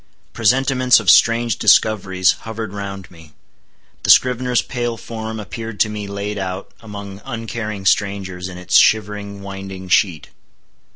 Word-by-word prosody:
Presentiments 130 -1 +3
of 100 -5 +4
strange 115 +1 +3
discoveries 95 -4 +3
hovered 110 -2 -6
round 100 -2 -7
me. 80 -3 -16 0.7
The - - -4
scrivener's 125 -1 +4
pale 120 -2 -3
form 110 0 -6
appeared 115 +1 -7
to 110 - +3
me 105 -1 -5
laid 100 +1 -4
out, 95 0 -5
among 100 -2 -9
uncaring 115 -4 -5
strangers, 95 -2 0
in 90 - -9
its 90 0 +2
shivering 105 -2 0
winding 95 -1 -8
sheet. 85 -4 +1
100 Hz, 130 wpm, -19 LUFS, 95-115 Hz, 0.7 s, of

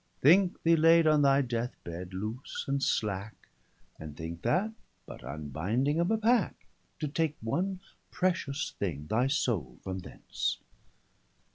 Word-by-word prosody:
Thinke 180 +6 +4
thee 165 0 +5
laid 165 +1 +6
on 155 -1 +5
thy 140 0 +5
death 120 -1 -2
bed, 90 +2 -7
loose 110 +7 -5
and 140 0 0
slacke; 105 -4 -2 0.5
And 75 -2 -8
thinke 80 +1 -6
that, 185 - +1 0.3
but - - -10
unbinding 90 - -1
of 170 +2 +2
a 220 - +3
packe, 225 0 +1 0.4
To 150 - 0
take 155 +1 -1
one 180 - -2 0.3
precious 165 -5 -1
thing, 75 -7 -2
thy 115 +11 +1
soule 120 - -1
from 95 0 -4
thence. 90 - -3
130 Hz, 140 wpm, -30 LUFS, -, 0.5 s, laid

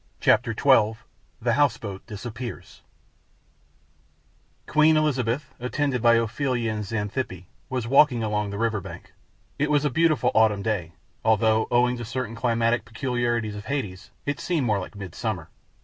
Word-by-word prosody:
CHAPTER 115 -2 +3
XII: 115 -6 +4 0.4
THE 120 0 +1
HOUSE 140 -3 +3
BOAT 100 -4 -7
DISAPPEARS 115 +3 -7 1.8
Queen 155 +1 +4
Elizabeth, 135 -3 0
attended 125 +1 -1
by 115 0 +6
Ophelia 115 0 0
and 105 0 -3
Xanthippe, 105 -2 -3 0.2
was 125 -3 -2
walking 130 -2 +4
along 105 -1 -1
the 100 - -5
river 110 -2 0
bank. - - -10 0.5
It 150 +1 +1
was 150 -1 +2
a 145 - +1
beautiful 155 -4 +2
autumn 110 -3 +3
day, 90 -7 -2 0.3
although, 110 0 +3
owing 125 0 +2
to 120 - -5
certain 120 0 -4
climatic 115 0 +1
peculiarities 120 -2 -2
of 105 +1 -8
Hades, 105 -10 -4 0.2
it 145 - -2
seemed 165 -7 0
more 105 -3 +1
like 90 - -8
midsummer. 95 -2 -5
115 Hz, 145 wpm, -25 LUFS, 105-130 Hz, 1.8 s, by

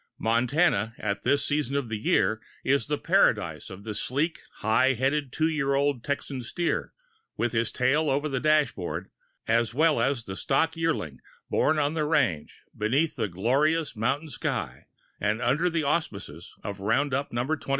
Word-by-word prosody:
Montana, 120 - +2
at 100 -1 -2
this 140 0 +2
season 145 -2 -1
of 140 -3 0
the 110 -1 -3
year, 110 +1 +2 0.2
is 140 +1 +2
the 150 0 0
paradise - - +2
of 95 +1 -10
the 110 0 -4
sleek, 145 +10 -1 0.2
high 130 +5 +3
headed, 135 +2 0
2 160 +4 +1
year 145 -4 0
old 140 -3 +1
Texan 140 -2 -3
steer, 170 +8 -2 0.5
with 120 - 0
his 115 -1 0
tail 145 +5 +2
over 140 +3 +1
the 135 -3 -1
dashboard, 125 - 0 0.4
as 115 0 +1
well 155 +1 +3
as 135 -3 0
the 95 - -6
stock 160 +9 +1
yearling, 165 - -2 0.3
born 155 - +3
on 145 0 +1
the 155 -2 0
range, 130 - 0
beneath 140 +9 +1
the 110 - -1
glorious 135 - +1
mountain 135 +8 -1
sky - - -4 0.3
and 105 +2 0
under 135 +9 +2
the 165 -2 -1
auspices 100 - -3
of 100 -1 -5
roundup 135 +7 0
No. 120 +1 0
21. 155 +2 -1
135 Hz, 165 wpm, -27 LUFS, 110-150 Hz, 0.5 s, high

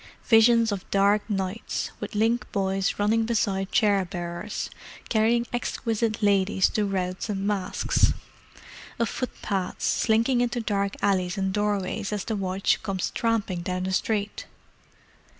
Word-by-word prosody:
Visions 230 0 +5
of 195 -2 -5
dark 200 +1 +3
nights, 195 +2 -2
with - - -6
link 225 +3 +1
boys 195 -2 0
running 220 +2 +2
beside 195 -4 0
chair 205 -4 +3
bearers, 175 +2 -5 0.4
carrying 235 +1 +2
exquisite 230 -2 -1
ladies 195 -1 +3
to 210 - 0
routs 185 +1 -2
and 195 -1 -2
masques: 205 -2 +1 0.9
of 230 - +1
foot 255 - -5
pads, 190 -2 -2
slinking 230 +2 +2
into 245 0 0
dark 200 -3 -1
alleys 185 -3 +1
and 190 -1 -1
doorways 205 0 -1
as 210 -2 -3
the 220 - -2
watch 190 -1 0
comes 195 -3 -2
tramping 215 -6 0
down 180 +1 -2
the 190 0 -2
street. 210 +1 -1
205 Hz, 135 wpm, -26 LUFS, 190-225 Hz, 0.9 s, Visions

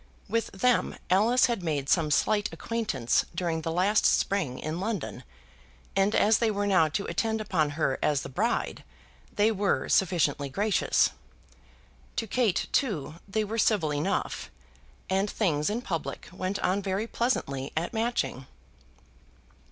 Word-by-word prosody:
With 230 -1 0
them 245 +5 +1 0.2
Alice 225 +7 +5
had 235 -5 -1
made 150 -5 -2
some 160 0 +2
slight 205 +7 +2
acquaintance 210 - 0
during 170 -3 -1
the 165 - -3
last 190 +5 +2
spring 170 -11 +1
in 155 +3 -4
London, 205 -3 -3 0.7
and 195 +2 +2
as 215 +1 +4
they 230 - +2
were 205 -1 -1
now 185 -5 +4
to 155 +6 -3
attend 220 -1 -1
upon 175 -8 0
her 140 -4 0
as 145 -2 +1
the - - -5
bride 215 - -1 0.5
they 210 +2 +3
were 200 -1 0
sufficiently 150 -6 +2
gracious. 205 +8 +2 1.0
To 225 - -1
Kate, 225 -3 +1
too, 165 - -1
they 215 +2 0
were 220 +2 -3
civil 180 -10 +2
enough, 155 +8 -2 0.6
and 195 +2 +1
things, 155 -8 0
in 230 +4 -2
public, 165 -7 -4
went 185 +2 -2
on 190 +3 +1
very 195 +2 -1
pleasantly 140 - -1
at 170 +7 -1
Matching. 220 - -1
195 Hz, 145 wpm, -28 LUFS, 160-220 Hz, 1.0 s, Alice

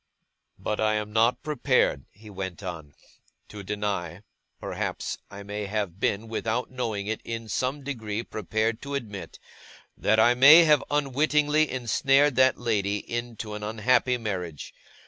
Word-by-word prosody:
'But 105 - -3
I 110 0 +2
am 105 0 -3
not 115 +2 +2
prepared,' 135 - +1
he 110 +2 -17
went 95 -2 -6
on, 80 -6 -7 0.5
'to 105 - -8
deny 100 -3 -3 0.4
perhaps - - -4
I 100 0 -9
may 105 0 -5
have 100 -3 -3
been, 105 +1 0
without 115 +2 -2
knowing 115 -6 -3
it, 110 +1 -3
in 115 -1 -5
some 130 +6 -2
degree 115 -5 -4
prepared 110 +2 -2
to 140 0 -5
admit 105 -8 -6 0.6
that 110 +1 +2
I 120 +2 +6
may 145 +7 +9
have 150 -3 +4
unwittingly 150 +2 +2
ensnared 135 +3 +2
that 130 0 +5
lady 105 -4 0
into 115 0 -5
an 105 - -6
unhappy 115 +4 +1
marriage. 90 -9 -5
110 Hz, 145 wpm, -26 LUFS, 105-130 Hz, 0.6 s, may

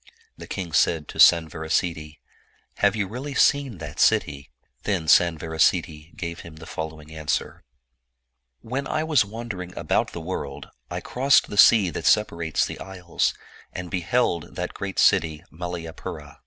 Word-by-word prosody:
The - - -11
king 90 -5 -5
said 75 +2 +2
to - - -9
Sanvarasiddhi, 80 -1 +3 0.3
'' - - -39
Have 100 +2 +4
you 100 -3 -1
really 130 +7 -6
seen 140 -7 +2
that 75 -2 -8
city?" 70 0 +2 0.3
Then 95 -6 -1
Sanvarasiddhi 80 -1 +2
gave 85 -1 -5
him 85 -2 -11
the 80 - -11
following 80 -1 -7
answer: 80 -1 -3 0.5
" 60 0 -54
When 135 +2 -2
I 155 - -1
was 155 -7 +3
wandering 100 -4 -7
about - - 0
the - - -5
world, 80 -5 -6 0.2
I - - -4
crossed 135 +3 +2
the - - -4
sea 100 -4 +6
that 80 - -3
separates 85 -7 +2
the - - -7
isles, 90 -3 -2 0.4
and 90 -1 -6
beheld 85 -2 0
that 90 0 -4
great 100 -1 -6
city 80 -6 +3
Malayapura. 85 -1 -7
85 Hz, 150 wpm, -24 LUFS, 80-100 Hz, 0.5 s, sea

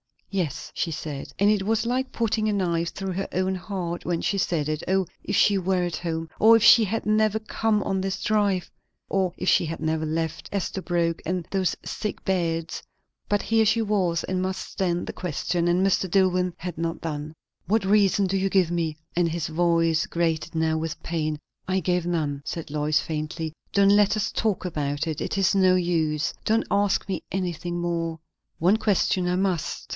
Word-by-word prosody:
_" - - -35
"Yes," 175 -8 -2
she 165 - -2
said. 150 -2 -5
And 200 +1 +4
it 210 -2 +2
was 220 +2 +1
like 255 +2 -1
putting 220 -2 0
a 210 - +1
knife 170 -4 0
through 195 -1 -5
her 195 +2 -3
own 185 +1 +1
heart 180 -2 -4
when 170 -2 -1
she 200 - 0
said 160 -5 0
it. 155 +1 -2
O, 190 0 +2 0.2
if - - -1
she 200 -2 +4
were 185 -1 +1
at 175 -2 -2
home! 165 -1 -3
O, 225 +1 +7
if 225 -2 +5
she 230 -2 +8
had 220 +3 -2
never 215 0 +2
come 220 -1 0
on 190 - -1
this 195 0 -3
drive! 205 -4 +1 0.4
O, 190 -2 +1
if - - 0
she - - +4
had 165 0 -5
never 160 0 0
left 160 +1 -3
Esterbrooke 175 -3 -1
and 180 0 -2
those 190 -2 +1
sick 210 - -4
beds! 165 -3 -1 0.5
But 205 0 +1
here 225 0 +3
she 220 +2 +3
was, 190 -6 +1
and 185 0 -2
must 190 0 -3
stand 175 -2 -1
the - - -6
question; 175 0 -1
and 180 +2 +3
Mr. 190 -1 +1
Dillwyn 180 -1 +2
had 175 -2 -6
not 165 0 -3
done. 150 -1 -4 0.3
"What 215 +1 +2
reason 200 0 +4
do 190 +1 0
you 195 +1 +1
give 185 -3 +2
me?" 165 -3 -1 0.2
and 175 -1 +3
his 165 -1 -2
voice 165 0 +2
grated 165 -1 -1
now 160 0 +1
with 160 0 -4
pain. 155 -2 -2 0.3
"I 190 0 +1
gave 180 0 0
none," 150 -5 -1
said 165 -4 -5
Lois 150 0 +1
faintly. 155 0 -4 0.2
"Don't 200 0 +5
let 205 +1 +5
us 215 +1 -1
talk 215 -4 0
about 150 -3 -2
it! 155 -2 -3
It - - -3
is 195 -2 +3
no 185 -2 +4
use. 160 -4 0
Don't 225 +1 +2
ask 200 0 +2
me 185 -4 -2
anything 175 -2 -2
more!" 165 -1 -2 0.4
"One 185 +6 +4
question 195 -4 +1
I 180 - +1
must. 185 -4 -1
180 Hz, 195 wpm, -25 LUFS, 165-195 Hz, 0.5 s, she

